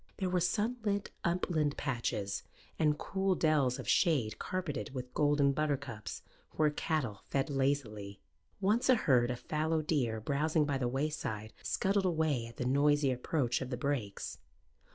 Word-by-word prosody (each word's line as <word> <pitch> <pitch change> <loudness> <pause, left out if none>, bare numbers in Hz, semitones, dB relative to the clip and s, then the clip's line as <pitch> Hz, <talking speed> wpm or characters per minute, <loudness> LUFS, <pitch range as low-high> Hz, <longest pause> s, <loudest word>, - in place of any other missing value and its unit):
There 185 -2 -1
were 180 - +3
sunlit 210 +2 0
upland 170 -4 0
patches 115 -7 -2 0.4
and 150 -1 +3
cool 190 +2 0
dells 145 -6 +2
of 130 - -7
shade 135 - +2
carpeted 155 -7 -3
with 125 -1 -5
golden 145 -1 +3
buttercups, 140 -6 -3 0.3
where 155 -1 +3
cattle 145 - -2
fed 140 +2 0
lazily. 120 -8 -1 0.4
Once 210 +6 +2
a 255 - +8
herd 125 - +3
of 125 -1 -3
fallow 155 +3 0
deer 125 -8 0
browsing 150 +6 +1
by 140 -2 -1
the 125 - 0
wayside 120 -6 -2
scuttled 195 0 +1
away 160 -9 +1
at 115 - -13
the 125 - -2
noisy 140 +1 +3
approach 125 0 0
of 130 - -4
the 125 - -3
brakes. 125 -6 -3
145 Hz, 150 wpm, -33 LUFS, 125-160 Hz, 0.4 s, a